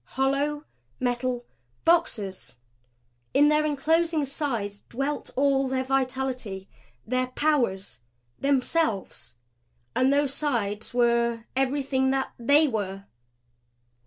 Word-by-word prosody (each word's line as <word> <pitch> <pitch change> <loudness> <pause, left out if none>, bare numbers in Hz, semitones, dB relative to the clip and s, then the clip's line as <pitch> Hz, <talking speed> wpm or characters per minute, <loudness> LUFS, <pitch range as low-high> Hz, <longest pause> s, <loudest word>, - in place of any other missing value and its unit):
Hollow 280 +2 +1 0.4
metal 245 0 -1 0.4
boxes! 210 - +1 0.8
In 295 +1 +6
their 300 0 +3
enclosing 315 +2 +1
sides 235 -8 -3
dwelt 275 +4 -2
all 275 0 +2
their 260 0 0
vitality 255 -6 -2 0.4
their 255 +2 0
powers 240 - 0 0.4
themselves! 275 - 0 0.6
And 260 +1 +3
those 285 -1 +2
sides 220 -8 -1
were 235 -1 +2
everything 270 0 +1
that 270 0 0
THEY 285 +6 +5
were! 195 -5 -3
265 Hz, 95 wpm, -26 LUFS, 235-285 Hz, 0.8 s, In